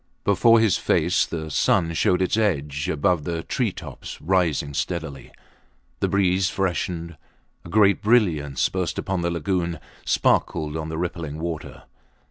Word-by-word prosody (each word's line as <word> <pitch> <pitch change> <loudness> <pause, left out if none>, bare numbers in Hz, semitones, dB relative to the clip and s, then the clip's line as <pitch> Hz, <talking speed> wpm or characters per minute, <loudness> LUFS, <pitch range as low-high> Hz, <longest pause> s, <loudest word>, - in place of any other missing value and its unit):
Before 115 +3 +5
his 110 -5 +3
face 85 +3 +2
the 80 -2 -5
sun 85 - +2
showed 90 +3 +2
its 95 - +1
edge 75 -9 0
above 80 +1 +1
the 80 +1 -3
tree - - -1
tops - - -9
rising 85 -5 0
steadily. 75 -3 -4 0.7
The - - +1
breeze 95 -1 +2
freshened; 85 -3 -2 0.5
a - - -11
great 100 +1 +4
brilliance 85 - +2
burst 90 -4 -3
upon 95 -2 -2
the 85 - 0
lagoon, 85 0 -1 0.2
sparkled 75 -1 +1
on 80 0 -4
the 80 - -4
rippling 85 -3 -4
water. 80 -1 -6
85 Hz, 140 wpm, -23 LUFS, 80-95 Hz, 0.7 s, Before